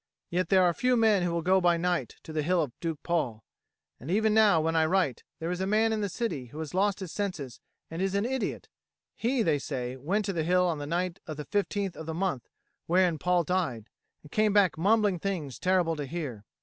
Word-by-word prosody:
Yet 175 0 0
there 190 -1 +5
are 175 -1 +3
few 250 +6 +2
men 220 -4 +4
who 175 - 0
will 170 -1 -1
go 190 +2 +4
by 175 -1 +3
night 175 +1 -1
to 160 - -9
the 155 - 0
Hill 175 +4 +1
of 140 - -5
Duke 165 -3 -4
Paul; 130 -11 -1 0.6
and 135 - -9
even 215 +3 +2
now 210 -6 +5
when 165 +1 0
I 160 -1 +3
write, 180 -7 +1
there 165 +2 -3
is 180 +1 -3
a 190 - 0
man 220 +2 +3
in 215 - -1
the 205 - -1
city 180 - -3
who 145 - -12
has 160 0 -5
lost 200 +1 +1
his 185 -4 -5
senses 175 - -4 0.3
and 165 +2 -4
is 195 0 0
an 200 +2 +1
idiot: 260 0 -3 0.5
he, 240 +1 +1
they 155 -6 +2
say, 130 -3 -4
went 185 +11 -1
to 195 - -2
the 165 - -1
hill 180 +2 +3
on 165 -4 -1
the 145 - -5
night 180 +3 -2
of 155 -2 -5
the 150 - -6
15th 200 -2 -1
of 160 - -8
the 160 - -3
month 175 -9 -2 0.4
wherein 175 -2 +3
Paul 180 +1 +2
died, 145 - -2 0.3
and 150 - -15
came 215 -1 +2
back 200 -4 +4
mumbling 205 +1 +2
things 165 -9 -3
terrible 180 -3 +2
to 145 -2 -4
hear. 130 -9 -5
180 Hz, 235 wpm, -28 LUFS, 155-195 Hz, 0.6 s, there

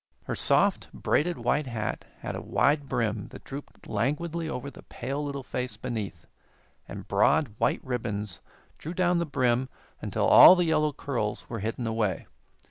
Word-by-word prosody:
Her - - -4
soft, - - +2
braided 175 +3 0
white 150 -1 0
hat 115 -4 -3 0.2
had - - -4
a - - -5
wide 145 -1 +1
brim 110 -3 -1
that - - -12
drooped 140 +1 -9
languidly 160 +9 -1
over 140 -1 -5
the - - -13
pale 135 +4 -5
little 140 -2 -4
face 125 0 -4
beneath, 115 -6 -5 0.6
and - - -8
broad, 130 -9 +3
white 115 - +1
ribbons 105 -6 -3 0.4
drew 165 +4 -6
down 180 -1 +2
the 170 - -1
brim 130 -2 +1 0.3
until - - -1
all 185 - +10
the 180 -1 +1
yellow 155 -2 +2
curls 120 -7 -3
were 115 - -3
hidden 115 +4 -3
away. 110 -4 -1
130 Hz, 160 wpm, -27 LUFS, 115-150 Hz, 0.6 s, all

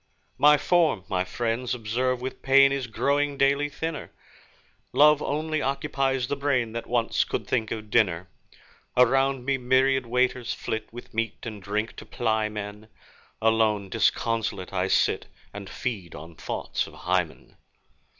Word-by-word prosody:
My 150 0 +7
form, 160 - +2
my 90 -2 +1
friends 120 +6 -2
observe 125 +2 -1
with 130 +1 -6
pain, 135 0 +6
Is 135 -2 -2
growing 140 +4 0
daily 140 +2 +2
thinner. 160 +1 -5 0.8
Love 150 +2 +6
only 155 +1 -1
occupies 135 -1 0
the 140 +3 -2
brain 135 -5 0
That 115 +1 -5
once 120 -1 +1
could - - -4
think 110 -4 -1
of 110 -2 -6
dinner. 95 -6 +2 0.7
Around 135 0 +3
me 135 -1 +1
myriad 130 0 +2
waiters 125 0 0
flit, 110 -1 -4
With 120 +1 -11
meat 115 0 -2
and 110 -3 -6
drink 105 +3 -2
to - - -9
ply 110 -2 0
men; 105 0 -7 0.6
Alone, 110 -3 +2
disconsolate, 110 -2 0
I 90 0 0
sit, - - +1 0.3
And 100 -1 -8
feed 100 -9 -5
on 80 +3 -10
thoughts - - -3
of - - -13
Hymen. 90 -3 -2
120 Hz, 145 wpm, -26 LUFS, 105-135 Hz, 0.8 s, My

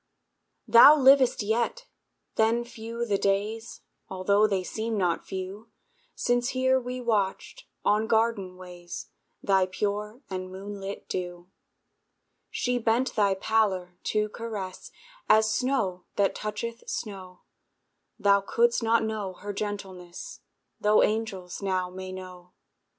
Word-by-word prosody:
Thou 235 +7 +9
livest 265 -4 +5
yet! 235 - -1 0.5
Then 225 +2 +2
few 235 0 -5
the 200 -3 0
days, 210 +4 -1 0.3
Altho' 200 +3 +3
they 195 -3 0
seem 220 +3 -3
not 175 -4 0
few, 190 +4 -6 0.5
Since 245 0 +1
here 260 0 +3
we 250 0 -5
watched, 225 - -1 0.2
on 215 +2 +3
garden 220 -5 +1
ways, 180 -1 -9 0.3
Thy 190 -2 +3
pure 210 +6 -3
and 185 -1 -5
moonlit 195 +1 -7
dew. 175 0 -5 1.0
She 250 0 -1
bent 235 +3 +1
thy 200 -3 +3
pallor 190 -4 0
to 210 0 +1
caress, 210 -5 -6 0.4
As 220 0 +5
snow 215 -9 0
that 200 -1 +2
toucheth 215 +2 -5
snow; 185 -4 -6 0.8
Thou 200 -2 +4
couldst 235 +5 +2
not 230 0 +3
know 215 -4 -3
her 205 +3 -7
gentleness, 195 - -6 0.4
Tho' 210 +1 +4
angels 205 -5 -2
now 185 -2 -1
may 185 0 -7
know. 180 -1 -10
205 Hz, 120 wpm, -27 LUFS, 185-230 Hz, 1.0 s, Thou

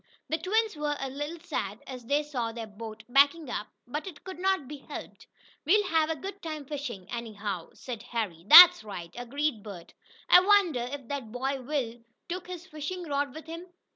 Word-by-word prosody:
The 320 - 0
twins 435 +5 +1
were 295 -1 -2
a 270 -1 -4
little 295 +5 -5
sad 210 - -3
as 255 -2 -8
they 290 +3 +2
saw 250 -6 -3
their 230 0 -6
boat 220 +1 -9
backing 280 +2 +4
up, 210 - -3 0.2
but 295 +8 -5
it 320 -6 -10
could 375 -1 -8
not 380 -7 +1
be 295 +2 -7
helped. 275 - -10 0.4
"We'll 410 +7 +4
have 320 -1 +2
a 320 - 0
good 390 +6 -8
time 310 -3 -5
fishing, 270 -9 -5
anyhow," 210 -6 -5
said 240 -4 -7
Harry. 220 -9 -4
"That's 355 +2 +11
right," 180 -5 -8
agreed 245 0 -2
Bert. 190 -5 -10 0.3
"I 360 - +9
wonder 365 -11 +3
if 275 -4 -7
that 270 -6 -4
boy 265 +2 -2
Will 250 -4 -3 0.3
took 355 +1 -5
his 360 -1 -7
fishing 355 +2 -5
rod 280 -1 -1
with 315 - -9
him? 335 +2 -8
285 Hz, 190 wpm, -28 LUFS, 235-330 Hz, 0.4 s, That's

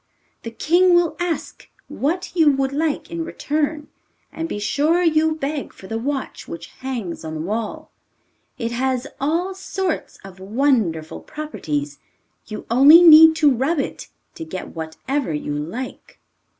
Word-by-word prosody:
The 230 - -6
king 350 +9 +3
will 345 -2 +2
ask 350 -2 -4 0.2
what 355 +6 -3
you 320 -4 +5
would 270 -1 0
like 305 +1 -2
in 335 -1 -3
return, 300 -1 -2 0.4
and 325 0 -5
be - - -3
sure 300 +11 +1
you 315 -1 +2
beg 290 -1 -4
for - - -14
the 225 +4 -4
watch 275 +2 -4
which 170 0 -8
hangs 240 -12 -5
on 160 0 -6
the 155 - -4
wall. 215 +6 -4 0.7
It 230 -1 -3
has 255 +1 -1
all 335 +7 0
sorts 380 -2 -4
of 195 -1 -12
wonderful 200 - 0
properties, 150 - -5 0.5
you 215 - -7
only 290 +8 +8
need 320 -1 +9
to 300 -4 +4
rub 270 +7 0
it 275 - -4 0.3
to - - -7
get 170 +4 -7
whatever 165 - -3
you 150 0 -4
like. 170 - -6
275 Hz, 150 wpm, -21 LUFS, 210-320 Hz, 0.7 s, need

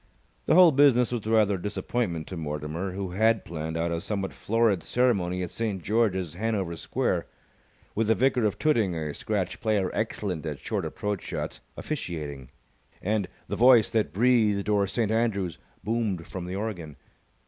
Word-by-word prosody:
The - - +4
whole 180 -2 +8
business 130 -4 +4
was 115 -3 -3
rather 110 -3 +3
a - - -10
disappointment 105 -4 -2
to 95 - -5
Mortimer, 80 +3 -4
who 95 -1 -4
had 110 +3 +2
planned 80 -1 -4
out 85 +1 0
a 85 0 -2
somewhat 100 -1 -3
florid 110 -4 +1
ceremony 90 -6 +1
at 90 - -5
St. 105 -6 -3
George's, 95 -6 +1
Hanover 95 -3 -2
Square, 80 - -1 0.7
with 110 0 0
the 110 - +4
Vicar 130 0 +2
of 105 - 0
Tooting 115 - +2
(a 75 -2 -3
scratch 95 -2 -2
player 105 -4 +1
excellent 100 -6 -2
at 75 -2 -4
short - - -3
approach 105 -2 -3
shots) - - -5 0.2
officiating, 75 - -5 0.5
and 105 -1 0 0.2
"The - - -3
Voice 120 -2 +6
That 110 -2 +1
Breathed 105 -3 +2
O'er 100 -1 +3
St. 110 +2 -1
Andrews" 100 -7 0 0.2
boomed 105 -6 -1
from 90 -2 -6
the 90 +1 -4
organ. 95 -8 -4
100 Hz, 165 wpm, -27 LUFS, 90-115 Hz, 0.7 s, whole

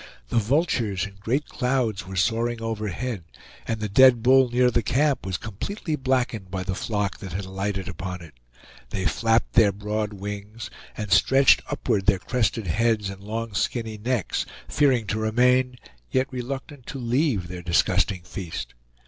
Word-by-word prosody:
The 115 - +2
vultures 115 - +1
in 100 -1 -11
great 130 +8 0
clouds 125 -7 -1
were 95 - -7
soaring 115 +5 +1
overhead, 110 -1 -3 0.4
and 115 -1 -1
the 105 - -2
dead 120 +2 +6
bull 130 0 +6
near 125 +1 +3
the 120 - +2
camp 135 +1 +1
was 95 -2 -1
completely 155 - -4
blackened 130 -7 -1
by 95 0 -3
the 95 0 -2
flock 105 0 -2
that 95 -4 -7
had 95 +1 -3
alighted 95 0 -3
upon 90 -1 -5
it; 80 - -13 0.6
they 95 +6 -3
flapped 115 +7 +1
their 105 -3 +6
broad 105 +1 -3
wings, 105 +3 -7 0.3
and 105 -2 -4
stretched 135 +9 +5
upward 95 -2 -1
their 100 -2 +5
crested 115 +1 -1
heads 105 +3 +1
and 95 0 -10
long 110 +1 -4
skinny 110 +1 -2
necks, 120 -3 -1 0.2
fearing 135 -6 +2
to 105 +2 -2
remain, 125 +3 +2 0.3
yet 130 +1 0
reluctant 135 +1 -6
to 140 - -5
leave 120 - 0
their 90 0 -7
disgusting 90 +2 +1
feast. 80 -11 -6
110 Hz, 160 wpm, -25 LUFS, 95-125 Hz, 0.6 s, dead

